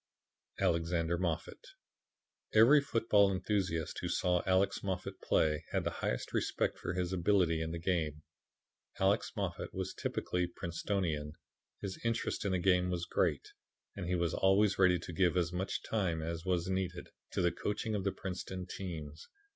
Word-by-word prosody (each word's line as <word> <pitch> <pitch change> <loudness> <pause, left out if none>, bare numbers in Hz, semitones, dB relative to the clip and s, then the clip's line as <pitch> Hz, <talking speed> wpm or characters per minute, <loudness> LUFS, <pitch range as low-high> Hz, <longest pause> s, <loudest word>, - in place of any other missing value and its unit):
Alexander 85 0 +1
Moffat 85 -3 -3 0.9
Every 125 +7 +8
football 110 -6 +3
enthusiast 95 -4 -1
who - - -3
saw 90 -1 +2
Alex 95 +1 +2
Moffat 95 -2 -4
play 75 0 +2
had - - +1
the - - -1
highest - - -2
respect - - 0
for - - -3
his 90 0 -1
ability 90 -3 +2
in 80 - -2
the 85 - -4
game. 80 -4 -1 0.8
Alex - - +2
Moffat - - -3
was 95 0 -3
typically 90 0 -1
Princetonian. 85 -3 -2 0.5
His 95 -2 -5
interest 115 -1 -1
in 100 - +1
the - - +3
game 90 0 +3
was 85 -1 -1
great, - - 0 0.5
and 95 -3 -4
he 90 - +1
was 85 -2 0
always 95 +1 +3
ready 90 -2 +5
to 85 +1 -8
give 90 +1 +2
as 85 -1 +1
much 95 +2 -2
time 90 -7 -1
as 85 +1 -4
was 90 -2 0
needed 95 -2 -2 0.2
to - - +1
the 85 - +3
coaching 105 +4 -2
of 100 -2 -1
the 100 - +1
Princeton 95 -1 -5
teams. 80 -5 -7
90 Hz, 160 wpm, -33 LUFS, 85-95 Hz, 0.9 s, Every